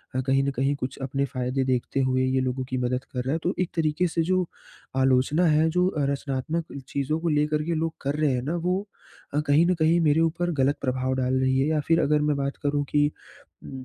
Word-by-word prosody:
अ, 130 - +1
कहीं 135 +1 +2
न 140 - 0
कहीं 135 +2 +1
कुछ 130 -1 -5
अपने 135 +1 -1
फ़ायदे 130 0 -2
देखते 130 +1 -1
हुए 130 0 +1
ये 130 0 +1
लोगों 130 0 -2
की 130 - -2
मदद 125 +1 -1
कर 125 -1 -2
रहा 130 +3 -1
है। 165 - -1
तो 180 - 0
एक 185 - 0
तरीके 160 +2 +1
से 165 0 -1
जो 185 -1 +2 0.6
आलोचना 135 +6 +3
है 155 +1 +3
जो 180 +2 +2
अ, 150 -6 -1
रचनात्मक 140 +4 -3 0.2
चीज़ों 140 +3 -1
को 170 - 0
लेकर 150 0 +1
के 170 +1 -1
लोग 160 +1 -1
कर 140 +1 -1
रहे 150 -2 +3
हैं 125 - -1
ना 155 +6 -2
वो 180 +1 +1 0.5
अ, 145 - +2
कहीं 145 +4 +5
न 185 - +3
कहीं 160 +2 +4
मेरे 155 -1 +3
ऊपर 170 +2 0
ग़लत 140 +2 +2
प्रभाव 130 -1 -1
डाल 130 0 0
रही 130 0 +2
हैं। 135 - +2
या 155 -1 +1
फ़िर 165 0 +4
अगर 150 +1 +2
मैं 150 -1 +1
बात 140 0 -2
करूँ 145 0 +1
कि, 145 0 +2 0.6
उ 130 -1 -8
145 Hz, 240 wpm, -25 LUFS, 130-160 Hz, 0.6 s, कहीं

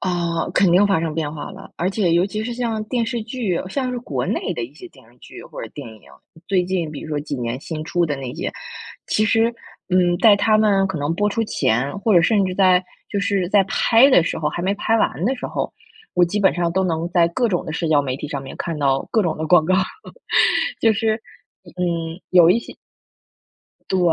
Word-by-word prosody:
啊， 170 -2 -1
肯 190 -3 +3
定 190 +4 +5
发 195 -5 +2
生 160 -2 -3
变 155 -2 -2
化 150 +2 -7
了。 195 0 -12
而 180 - 0
且 190 -4 0
尤 175 +3 +3
其 215 +2 -4
是 240 +2 -4
像 230 -3 -2
电 235 0 -1
视 235 -1 -3
剧， 225 -6 -2
像 255 +5 -2
是 250 - -3
国 135 - -3
内 - - -2
的 120 - -3
一 135 +5 -13
些 180 +3 -11
电 130 -7 -20
视 120 - -25
剧 - - -12
或 - - -9
者 - - -6
电 - - -8
影， 110 -1 -14 0.5
最 185 -2 +2
近 175 -4 -2
比 150 - -7
如 - - -9
说 150 -1 -2
几 145 -1 -5
年 120 +1 -4
新 155 -1 -6
出 175 +1 0
的 145 -4 -2
那 130 0 -6
些， 165 - -4 0.5
其 215 - +1
实， 225 +2 +2 0.4
嗯 175 -1 +3
在 210 +1 +6
它 215 +2 +3
们 200 -3 +3
可 180 -5 -4
能 145 +3 -1
播 205 +4 +1
出 225 +2 -1
前， 125 - 0
或 220 -1 +2
者 175 - +7
甚 200 +3 +3
至 185 - -2
在 185 -1 +4 0.2
就 200 - -2
是 195 -3 0
在 200 -1 +4
拍 230 +7 +4
的 175 - +6
时 - - -2
候， 150 -1 0
还 175 - -4
没 195 +2 0
拍 225 +2 +1
完 160 - 0
的 265 +4 +1
时 250 - -5
候， - - -3 0.4
我 180 - +5
基 205 +5 -2
本 190 - +4
上 175 -1 -1
都 190 +2 +1
能 170 -2 -1
在 170 -2 +3
各 235 +8 0
种 180 -2 -1
的 160 - -5
社 165 +1 -2
交 145 -2 +3
媒 130 -1 -3
体 150 - -6
上 140 -3 -5
面 135 - -9
看 165 -2 -4
到 135 -2 +1
各 220 - +3
种 165 -4 -1
的 160 - -2
广 160 0 +5
告， 185 +3 +2 1.1
就 225 - +4
是， 220 +1 +1 0.6
嗯， 170 -2 -2
有 175 -2 +6
一 210 - +4
些 - - -10 1.2
对， 190 - +1
180 Hz, 255 characters per minute, -21 LUFS, 160-205 Hz, 1.2 s, 者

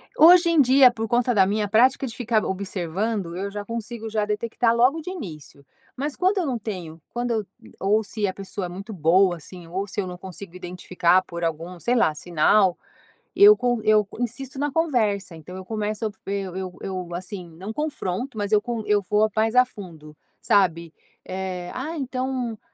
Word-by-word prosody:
Hoje 340 +2 +7
em 330 -3 +5
dia 260 0 +6
por 225 -1 -4
conta 245 +1 +2
da 195 -4 +5
minha 205 +2 0
prática 255 +6 +3
de 230 - -7
ficar 230 -3 +1
observando, 190 0 -3
eu 195 +2 -4
já 205 0 -6
consigo 230 0 -5
já 215 -1 0
detectar 230 +2 0
logo 255 +7 +3
de 315 - -7
início, 155 - -9 0.3
mas 285 +2 -3
quando 375 +3 +1
eu 365 - +1
não 260 -4 -1
tenho 175 -7 -7
quando 240 0 -2
eu, 220 -3 -1 0.3
ou 210 +3 +2
se 205 +1 -2
a 190 - -2
pessoa 195 -1 -5
é - - -5
muito 195 +5 -8
boa 175 +2 +3
assim, 175 +1 -11
ou 190 +4 -3
se 200 - -4
eu 190 - -1
não 180 0 -7
consigo 185 0 -10
identificar 180 0 +1
por 170 -1 -7
algum, 165 +2 -3
sei 240 +7 +1
lá, 225 -10 +3
sinal, 175 +4 +3 0.6
eu 415 +1 +8
con 245 -2 0
eu 215 -1 +4
insisto 250 +3 -4
na 290 0 -1
conversa, 220 - 0
então 160 +4 -10
eu 190 - -8
começo 215 +1 -3 0.2
eu 195 -2 -3
eu 185 -1 -6
eu 185 -3 -5
assim, 180 0 -6
não 185 +6 -7
confronto, 255 - -3
mas 205 0 -2
eu 210 - +5
con 235 -2 -3
eu 205 -1 +3
vou 210 +3 +2
mais 220 +1 +2
a 250 - +8
fundo 165 -10 -12 0.2
sabe, 170 -6 +2 0.3
eh, 185 -1 -5
"Ah 305 +6 -4
então 255 -3 -3
210 Hz, 190 wpm, -24 LUFS, 180-240 Hz, 0.6 s, eu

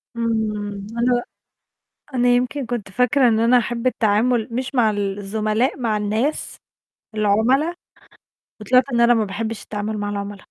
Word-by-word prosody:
إمم. 210 -3 -2
أنا 240 0 +2 0.9
أنا 245 0 +2
يمكن 250 +2 +1
كنت 230 -4 -4
فاكرة 250 +4 +3
إن 220 -1 +2
أنا 235 +2 +4
هاحب 240 +1 -3
التعامل 225 0 +1
مش 255 +3 -4
مع 230 -4 +3
ال 200 -1 -2
الزملاء، 215 +6 -1
مع 225 -4 0
الناس، 215 +8 -1 0.6
العملا، 225 +10 +2 0.9
وطلعت 255 +4 +4
إن 235 - +2
أنا 235 0 +5
ما 225 -2 +1
باحبش 220 +2 -4
التعامل 210 0 -4
مع 205 0 -3
العملا. 200 0 -5
225 Hz, 145 wpm, -21 LUFS, 210-245 Hz, 0.9 s, أنا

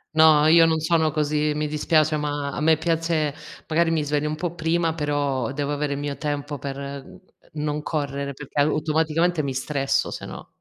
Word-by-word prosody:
No, 155 -1 +6
io 165 +1 +7
non 160 -1 +1
sono 160 0 +2
così, 150 0 0
mi 150 0 -1
dispiace 155 0 +2
ma 145 -1 -2
a - - -5
me 160 +1 +4
piace 165 -2 0 0.3
magari 165 +1 +2
mi 160 -2 +1
sveglio 150 +1 -1
un 155 - -2
po' 170 +2 -3
prima, 165 0 0
però 145 -5 -1
devo 145 0 -2
avere 145 0 -1
il 140 - -4
mio 145 -1 -4
tempo 145 -2 -3
per, 140 0 -5
ehm, 140 0 -6 0.5
n 150 - -5
n - - -2
non 150 0 -2
correre 140 -2 -3
perché 145 +1 -6
automaticamente 155 +3 +1
mi 135 -3 -3
stresso 135 +1 0
se - - -6
no. - - -9
150 Hz, 200 wpm, -23 LUFS, 145-160 Hz, 0.5 s, io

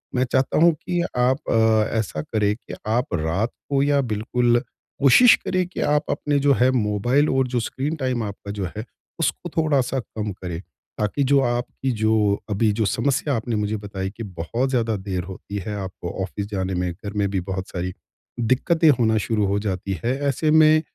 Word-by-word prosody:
मैं 125 - +3
चाहता 130 0 +1
हूँ 170 +1 +6
कि 175 +3 -2 0.2
आप 125 +2 +3
अ, 110 -1 +3
ऐसा 95 -8 -2
करें 105 +4 0
कि 115 - -11
आप 120 0 0
रात 90 +7 0 0.2
को 140 -1 +2
या 145 0 +3
बिल्कुल 120 +1 +1 0.4
कोशिश 145 - +7
करें 185 -1 +1
कि 180 - -8
आप 150 0 +2
अपने 145 -1 0
जो 140 0 +4
है 125 +1 +5
मोबाइल 120 +5 +2
और 135 -1 +2
जो 125 -1 -1
स्क्रीन 140 +6 -3
टाइम 130 -5 -1
आपका 100 -1 -6
जो 100 -2 -3
है 110 - -4 0.3
उसको 170 +1 -1
थोड़ा-सा 135 -5 +2
कम 105 -2 -5
करें। 90 -2 -6 0.4
ताकि 105 +7 0
जो 140 -1 +5
आपकी 125 +1 -1
जो 110 -2 +1
अभी 105 +1 +2
जो 110 +1 0
समस्या 140 - 0
आपने 115 0 -2
मुझे 105 +1 -1
बताई 100 -2 -5
कि 115 - -5
बहुत 100 +8 -2
ज़्यादा 115 -4 0
देर 95 -2 -3
होती 95 +2 -7
है 105 - -3
आपको 95 -3 -6
ऑफ़िस 100 +2 -4
जाने 95 -2 -2
में, 90 0 -1
घर 100 +4 -8
में 100 -2 0
भी 95 -1 -1
बहुत 95 +1 -4
सारी 90 0 -4 0.5
दिक्कतें 145 +8 +3
होना 110 -1 +3
शुरू 105 0 0
हो 100 +1 +1
जाती 95 -2 -3
हैं। 120 - +1 0.2
ऐसे 150 +3 +1
मैं 155 0 +6
110 Hz, 190 wpm, -23 LUFS, 100-135 Hz, 0.5 s, कोशिश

